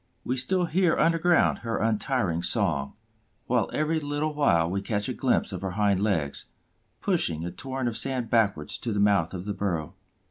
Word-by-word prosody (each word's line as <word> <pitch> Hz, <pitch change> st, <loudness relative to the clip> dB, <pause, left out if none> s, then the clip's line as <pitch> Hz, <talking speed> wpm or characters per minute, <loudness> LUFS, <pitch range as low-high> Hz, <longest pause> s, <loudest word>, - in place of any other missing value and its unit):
We 125 Hz, -, -1 dB
still 180 Hz, +8 st, +1 dB
hear 170 Hz, +1 st, +2 dB
underground 165 Hz, +1 st, +3 dB
her 115 Hz, -1 st, -3 dB
untiring 110 Hz, -5 st, 0 dB
song, 70 Hz, -4 st, 0 dB, 0.5 s
while -, -, +1 dB
every 155 Hz, +1 st, 0 dB
little 145 Hz, +1 st, -2 dB
while 85 Hz, -, +3 dB
we 95 Hz, +3 st, -2 dB
catch 105 Hz, 0 st, -2 dB
a 130 Hz, -, -2 dB
glimpse 125 Hz, -4 st, +1 dB
of 95 Hz, -2 st, -5 dB
her 95 Hz, -2 st, -3 dB
hind 100 Hz, -3 st, +2 dB
legs, 85 Hz, -9 st, -1 dB, 0.5 s
pushing 85 Hz, -, +1 dB
a 90 Hz, -, -4 dB
torrent 130 Hz, +2 st, -4 dB
of 115 Hz, -, -2 dB
sand 130 Hz, -2 st, -1 dB
backwards 100 Hz, -10 st, +1 dB
to 120 Hz, -, -3 dB
the 105 Hz, -, -1 dB
mouth 100 Hz, -5 st, +3 dB
of 90 Hz, 0 st, -6 dB
the 105 Hz, -, -2 dB
burrow. 90 Hz, -6 st, -2 dB
110 Hz, 180 wpm, -26 LUFS, 95-145 Hz, 0.5 s, underground